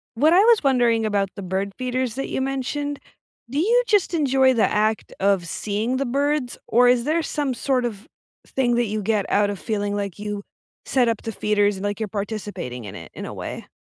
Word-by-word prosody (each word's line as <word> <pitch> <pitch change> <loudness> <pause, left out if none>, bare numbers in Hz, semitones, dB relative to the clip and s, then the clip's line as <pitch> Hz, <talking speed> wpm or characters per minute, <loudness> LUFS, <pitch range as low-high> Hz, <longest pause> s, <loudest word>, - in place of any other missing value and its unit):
What 300 +8 +4
I 360 - +7
was 465 -4 +5
wondering 240 -4 +3
about 200 -2 +1
the 200 - -6
bird 190 +2 -2
feeders 255 -2 -2
that 270 - -3
you - - -2
mentioned, 270 +2 -2 0.5
do 275 - -2
you 465 +9 +4
just 405 -4 +2
enjoy 265 -4 +3
the 225 - +3
act 215 0 0
of 195 -3 +2
seeing 215 +7 -2
the 275 +1 -1
birds, 280 0 0
or 245 +2 +5
is 245 -1 +3
there 320 +4 +1
some 290 -4 -2
sort 255 +1 0
of 220 -1 -4 0.4
thing 245 -2 +1
that 240 -1 +2
you 215 +1 -2
get 210 0 +1
out 205 0 +3
of 200 - -5
feeling 205 -1 -2
like 200 -3 -3
you 205 -1 -4 0.4
set 250 -3 +2
up 230 -2 -1
the 225 - -4
feeders 205 -1 +1
and, 190 - -6
like, 205 +1 -2
you're 220 - -2
participating 200 - -5
in 100 - -8
it, 85 -1 -9
in - - -6
a - - -7
way? - - -7
230 Hz, 215 wpm, -23 LUFS, 205-270 Hz, 0.5 s, I